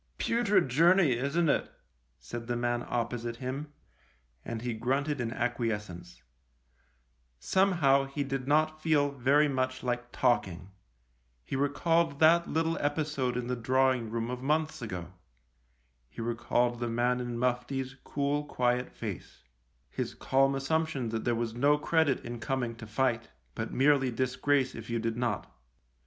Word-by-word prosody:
" - - -43
Putrid 230 - +2
journey, 165 +4 +4
isn't 140 +8 0
it? - - +1 0.3
" - - -43
said 115 - -7
the 120 - -1
man 120 0 -1
opposite 120 0 -2
him, 135 +4 -5 0.7
and 115 -1 -5
he 120 -1 -2
grunted 135 +5 -1
in 115 -1 -2
acquiescence. 105 - -3 1.1
Somehow 150 - +3
he 140 +1 -3
did 135 -1 -4
not 155 +1 +2
feel 150 -3 +2
very 140 +3 +3
much 130 -2 -2
like 120 -1 -2
talking. 95 -7 0 0.7
He 65 - -5
recalled 145 +2 +1
that 170 +2 +5
little 165 +1 0
episode 145 -4 -1
in 125 - -2
the 125 +1 -2
drawing 130 0 +1
room 115 +1 -2
of 125 0 -5
months 155 +1 0
ago; 90 -6 -6 1.0
he - - -13
recalled 120 +1 0
the 120 -1 -2
man 120 +2 +1
in 120 -1 -4
mufti's 125 +2 -1
cool, 145 +1 -1
quiet 125 -2 0
face - - -7 0.2
— - - -42
his - - -4
calm 135 +1 +2
assumption 140 -2 -1
that 110 0 -3
there 120 -1 +2
was 115 -1 -2
no 145 +5 +3
credit 155 -3 +1
in 120 0 -5
coming 120 -1 -2
to 110 - -9
fight, 120 +1 0 0.2
but 110 0 -4
merely 135 -1 +3
disgrace 130 +2 +1
if 115 0 -9
you 115 - 0
did 115 0 -2
not. 120 -4 -3
130 Hz, 150 wpm, -30 LUFS, 120-145 Hz, 1.1 s, that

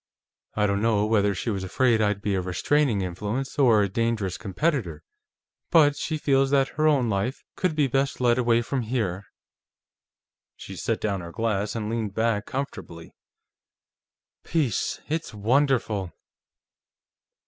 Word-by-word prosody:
I 105 - +2
don't 100 0 0
know 110 -2 +2
whether 105 -2 +2
she 115 - -2
was 95 -2 -3
afraid 115 +4 +2
I'd 105 -1 0
be 100 - 0
a 95 - 0
restraining 110 +5 +1
influence, 105 +10 -4
or 115 -6 +5
a - - +1
dangerous 110 -2 -1
competitor, 100 - -2 0.7
but 150 -4 +5
she 155 +1 -3
feels 135 -2 +2
that 135 -1 +2
her 155 +1 +1
own 140 -6 +3
life 110 +5 -2
could 180 -4 -1
be 150 -2 +3
best 135 +1 0
led 120 -1 +3
away 120 -1 +2
from 130 +2 -2
here." 105 -5 -2 1.3
She - - -9
set - - -2
down 100 -3 -1
her 85 0 -8
glass 105 0 -1
and 110 -2 -3
leaned 110 -3 -3
back 110 -2 0
comfortably. 100 -11 -6 1.3
"Peace, 145 - -1
it's 160 -6 -3
wonderful!" 110 -4 +1
115 Hz, 145 wpm, -25 LUFS, 100-135 Hz, 1.3 s, or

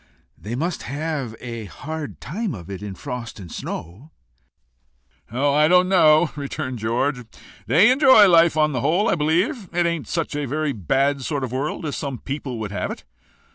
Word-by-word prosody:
"They 110 +3 -6
must 165 +5 -2
have 140 -4 -4
a 115 -3 -6
hard 155 +7 -7
time 195 - -4
of 90 0 -10
it 95 - -6
in 100 -2 -6
frost 120 0 -7
and 90 -5 -10
snow." 100 - -7 1.2
"Oh! 140 +4 +1
I 150 +1 +4
don't 180 +2 +5
know," 160 -4 +5
returned 140 -3 -4
George. 125 +4 -1 0.4
"They 165 - +6
enjoy 260 -6 +7
life 170 -2 +5
on 150 0 +3
the 125 -4 -2
whole, 185 - +2
I - - +3
believe. 175 - 0
It 175 0 +1
ain't 170 -3 -2
such 165 -2 -2
a 145 -1 -2
very 150 +2 -1
bad 135 - 0
sort 140 +1 -2
of 125 - -3
a - - -2
world 145 +4 -3
as 145 - -3
some 140 -4 -4
people 135 -1 -5
would 110 -2 -5
have 105 - -3
it. - - -7
145 Hz, 185 wpm, -22 LUFS, 125-165 Hz, 1.2 s, enjoy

